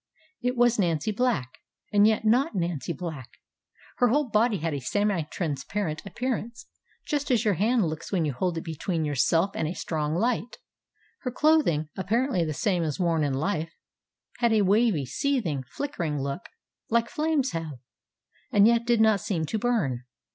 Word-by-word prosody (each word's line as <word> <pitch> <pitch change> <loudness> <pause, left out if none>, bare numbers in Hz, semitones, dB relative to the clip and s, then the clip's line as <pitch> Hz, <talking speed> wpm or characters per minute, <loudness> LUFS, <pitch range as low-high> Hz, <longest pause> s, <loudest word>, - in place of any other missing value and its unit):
It 250 0 -1
was 240 -1 +4
Nancy 170 +1 +1
Black, 200 - -1 0.3
and 205 0 +6
yet 220 0 +1
not 250 +5 +3
Nancy 170 -5 -2
Black; 160 -8 -6 0.7
her 245 - +4
whole 275 +2 +1
body 215 0 +3
had 165 -1 -2
a 140 - -2
semi 205 +6 0
transparent 155 +2 -3
appearance, 240 0 -4 0.4
just 295 -1 -2
as 245 -3 +2
your 210 - +3
hand 220 +4 +2
looks 155 -1 -5
when 175 -5 +1
you 145 - -1
hold 175 +5 -1
it 165 - -3
between 165 0 -2
yourself 165 +6 +2
and 160 - -1
a 170 - -4
strong 155 -2 -2
light; 235 +4 -1 0.6
her 255 - -3
clothing, 255 - +2
apparently 225 +1 0
the 155 - -2
same 180 +3 0
as 155 -1 -2
worn 165 -3 +2
in 140 -2 0
life, 160 +2 -1 0.7
had 235 -2 +3
a 215 -2 +4
wavy, 200 - +3
seething, 170 - -1
flickering 170 - -3
look, 140 0 -4 0.4
like 235 0 +2
flames 305 -5 0
have, 165 -2 -4 0.8
and 205 -4 +6
yet 235 +1 +3
did 235 -2 +3
not 220 -2 +4
seem 195 -7 -1
to 215 +8 -2
burn. 200 - 0
200 Hz, 170 wpm, -26 LUFS, 160-235 Hz, 0.8 s, and